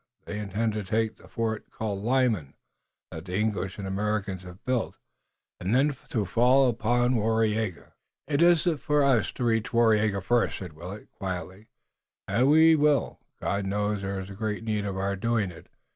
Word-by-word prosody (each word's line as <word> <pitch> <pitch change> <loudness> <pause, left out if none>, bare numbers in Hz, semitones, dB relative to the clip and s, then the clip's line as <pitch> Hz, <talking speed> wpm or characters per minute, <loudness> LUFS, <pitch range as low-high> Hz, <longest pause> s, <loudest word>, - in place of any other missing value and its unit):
They 105 - -5
intend 105 +2 -1
to 105 -1 -3
take 110 +3 -1
the - - -17
fort 110 -2 -3
called 105 -3 -4
Lyman, 115 - +1 0.6
that 80 +2 -8
the 90 -1 -5
English 100 -3 -1
and 100 -1 -5
Americans 100 -1 -2
have 90 0 -13
built, 125 -2 -1 0.6
and 95 +6 0
then 140 +2 +3
to 110 -4 0
fall 125 +6 +4
upon 120 +2 +1
Waraiyageh." 110 -5 0 0.4
"It 145 +1 +1
is 170 -2 +5 0.2
for 150 -1 +2
us 130 -6 +3
to 125 - -4
reach 115 -2 +1
Waraiyageh 110 -4 +3
first," 120 +4 +1
said 90 -5 -8
Willet, 90 +7 -9
quietly, 95 +2 -6 0.6
"and 130 +4 +2
we 160 +2 +7
will. 150 -1 +2 0.2
God 100 0 -1
knows 105 +1 -1
there 100 0 -3
is 95 +1 -7
great 105 +2 -3
need 105 -2 -1
of 100 -1 -3
our 100 +1 -1
doing 110 -1 0
it. 85 - -14
110 Hz, 170 wpm, -27 LUFS, 100-120 Hz, 0.6 s, we